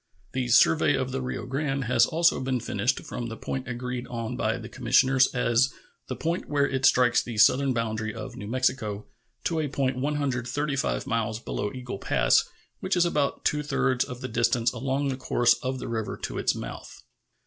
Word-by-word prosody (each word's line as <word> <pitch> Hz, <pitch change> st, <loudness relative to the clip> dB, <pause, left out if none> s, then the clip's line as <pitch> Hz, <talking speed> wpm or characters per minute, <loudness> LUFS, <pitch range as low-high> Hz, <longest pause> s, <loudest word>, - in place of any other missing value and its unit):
The 130 Hz, -1 st, -2 dB
survey 145 Hz, +5 st, +5 dB
of 130 Hz, -1 st, -2 dB
the 135 Hz, 0 st, -2 dB
Rio 125 Hz, 0 st, -4 dB
Grande 135 Hz, +1 st, -2 dB
has 120 Hz, 0 st, +3 dB
also 170 Hz, +1 st, +3 dB
been 130 Hz, -1 st, -1 dB
finished 110 Hz, +1 st, -1 dB
from 120 Hz, -, -5 dB
the 115 Hz, -, -7 dB
point 135 Hz, 0 st, -4 dB
agreed 125 Hz, 0 st, -4 dB
on 115 Hz, -2 st, -4 dB
by -, -, 0 dB
the -, -, -8 dB
commissioners 130 Hz, 0 st, +3 dB
as 125 Hz, +2 st, +2 dB, 0.4 s
"the 130 Hz, -, -4 dB
point 170 Hz, +6 st, -3 dB
where 140 Hz, -1 st, +2 dB
it 135 Hz, 0 st, +2 dB
strikes 125 Hz, -1 st, +4 dB
the 120 Hz, -2 st, -7 dB
southern 135 Hz, +5 st, +5 dB
boundary 110 Hz, -2 st, -2 dB
of 125 Hz, +2 st, -8 dB
New 105 Hz, -5 st, -7 dB
Mexico" 115 Hz, -4 st, -1 dB, 0.4 s
to 165 Hz, -2 st, 0 dB
a 155 Hz, -, 0 dB
point 135 Hz, -2 st, -1 dB
135 140 Hz, -, -1 dB
miles 110 Hz, -1 st, -1 dB
below 105 Hz, -2 st, -3 dB
Eagle 125 Hz, -5 st, -6 dB
Pass, -, -, +2 dB, 0.3 s
which 185 Hz, -1 st, -1 dB
is 175 Hz, -, +4 dB
about 150 Hz, -5 st, -1 dB
two 150 Hz, -, +2 dB
thirds 130 Hz, -3 st, +1 dB
of 125 Hz, 0 st, -8 dB
the 130 Hz, -, -3 dB
distance 120 Hz, -2 st, +1 dB
along 135 Hz, +1 st, -1 dB
the 130 Hz, -, -1 dB
course 120 Hz, -2 st, +3 dB
of 130 Hz, -1 st, -2 dB
the 125 Hz, -, -6 dB
river 110 Hz, -2 st, -3 dB
to -, -, -5 dB
its -, -, +1 dB
mouth. -, -, -8 dB
130 Hz, 190 wpm, -26 LUFS, 120-135 Hz, 0.4 s, survey